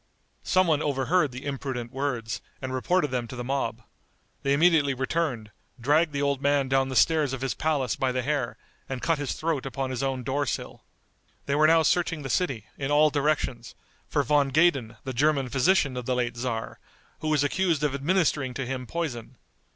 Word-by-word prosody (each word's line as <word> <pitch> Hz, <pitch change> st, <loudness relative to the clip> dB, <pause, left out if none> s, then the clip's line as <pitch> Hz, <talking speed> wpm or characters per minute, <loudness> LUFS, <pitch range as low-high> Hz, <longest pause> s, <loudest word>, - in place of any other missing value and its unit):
Some 185 Hz, 0 st, +3 dB
one 155 Hz, -3 st, +2 dB
overheard 145 Hz, +2 st, +1 dB
the 130 Hz, +2 st, -8 dB
imprudent 130 Hz, -4 st, -4 dB
words, 125 Hz, -5 st, -3 dB, 0.2 s
and 130 Hz, -1 st, -5 dB
reported 150 Hz, +3 st, +1 dB
them 125 Hz, -2 st, -2 dB
to 130 Hz, -, -8 dB
the 120 Hz, -, -5 dB
mob. 135 Hz, +2 st, -2 dB, 0.6 s
They 140 Hz, -, 0 dB
immediately 150 Hz, -2 st, +4 dB
returned, 130 Hz, -5 st, -2 dB, 0.3 s
dragged 150 Hz, +6 st, +3 dB
the 140 Hz, 0 st, -2 dB
old 140 Hz, -1 st, 0 dB
man 140 Hz, -1 st, +2 dB
down 135 Hz, 0 st, +2 dB
the 130 Hz, -, -4 dB
stairs 155 Hz, -1 st, +3 dB
of 135 Hz, -, -4 dB
his 135 Hz, -1 st, -1 dB
palace 145 Hz, -5 st, 0 dB
by 130 Hz, -1 st, 0 dB
the 130 Hz, 0 st, -1 dB
hair, 140 Hz, -3 st, -1 dB, 0.3 s
and 130 Hz, -1 st, -3 dB
cut 165 Hz, -3 st, +1 dB
his 145 Hz, -3 st, -2 dB
throat 160 Hz, -4 st, -2 dB
upon 135 Hz, 0 st, -3 dB
his 130 Hz, -1 st, -3 dB
own 135 Hz, -2 st, -1 dB
door 140 Hz, +3 st, -1 dB
sill. -, -, -4 dB, 0.6 s
They 140 Hz, -, -1 dB
were 155 Hz, +2 st, +5 dB
now 165 Hz, 0 st, +5 dB
searching 165 Hz, -2 st, +1 dB
the 135 Hz, -, -3 dB
city, 135 Hz, -, -1 dB
in 135 Hz, 0 st, -2 dB
all 150 Hz, +1 st, +4 dB
directions, 140 Hz, -6 st, -1 dB, 0.3 s
for 145 Hz, -, +1 dB
Von 140 Hz, +1 st, +2 dB
Gaden 135 Hz, -7 st, +2 dB
the 130 Hz, -, -4 dB
German 140 Hz, 0 st, +2 dB
physician 135 Hz, +2 st, +2 dB
of 125 Hz, -1 st, -5 dB
the 130 Hz, -, +1 dB
late 120 Hz, -1 st, -1 dB
tzar, 120 Hz, -2 st, -4 dB, 0.4 s
who 155 Hz, -, -4 dB
was 150 Hz, -2 st, +2 dB
accused 165 Hz, 0 st, +1 dB
of 145 Hz, -2 st, +1 dB
administering 145 Hz, -3 st, +1 dB
to 135 Hz, -, -3 dB
him 125 Hz, 0 st, -4 dB
poison. 130 Hz, -7 st, -4 dB
140 Hz, 195 wpm, -26 LUFS, 130-150 Hz, 0.6 s, were